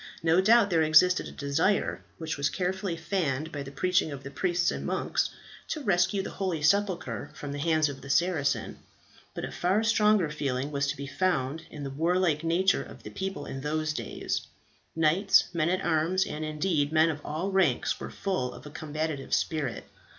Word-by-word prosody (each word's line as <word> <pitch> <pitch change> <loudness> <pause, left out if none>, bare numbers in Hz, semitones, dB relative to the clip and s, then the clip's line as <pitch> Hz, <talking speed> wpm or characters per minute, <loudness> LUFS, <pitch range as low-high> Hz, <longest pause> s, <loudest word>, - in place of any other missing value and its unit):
No 165 +2 +4
doubt 220 0 +5
there 165 -2 +3
existed 160 +4 +5
a - - -8
desire, 145 +8 0 0.2
which 160 -1 -3
was 140 0 0
carefully 185 -1 -2
fanned 160 -4 -1
by 145 - -5
the 140 - -7
preaching 180 +3 +1
of 140 -1 -7
the 140 - -7
priests 175 +3 +1
and - - -4
monks, - - 0 0.4
to 315 - -3
rescue 190 -1 +2
the - - -6
holy 180 -6 -2
sepulchre 175 - +1
from 145 - -6
the 145 - -4
hands 155 0 +2
of 135 -2 -7
the 140 - -10
Saracens; 140 -6 +1 0.6
but - - -3
a - - -7
far 190 +5 +1
stronger 210 -6 +3
feeling 140 -2 -2
was 140 -1 0
to 140 - -2
be 140 - -5
found 160 -1 -1
in 150 - -8
the 135 - -4
warlike 165 +1 +1
nature 180 +4 +2
of - - -11
the - - -8
people 190 -6 -4
in 135 - -6
those 155 +1 -1
days. - - -3 0.5
Knights, 165 +5 +4
men 170 -1 +1
at 185 +1 0
arms, 170 +5 +2
and 155 - -5
indeed 155 -1 0
men 160 +1 +4
of 150 -1 -7
all 165 +6 -3
ranks, 180 -10 +2
were - - -6
full 185 -11 -2
of - - -12
a 150 - -9
combative 155 -2 -2
spirit. 150 -6 -2
160 Hz, 190 wpm, -28 LUFS, 145-185 Hz, 0.6 s, doubt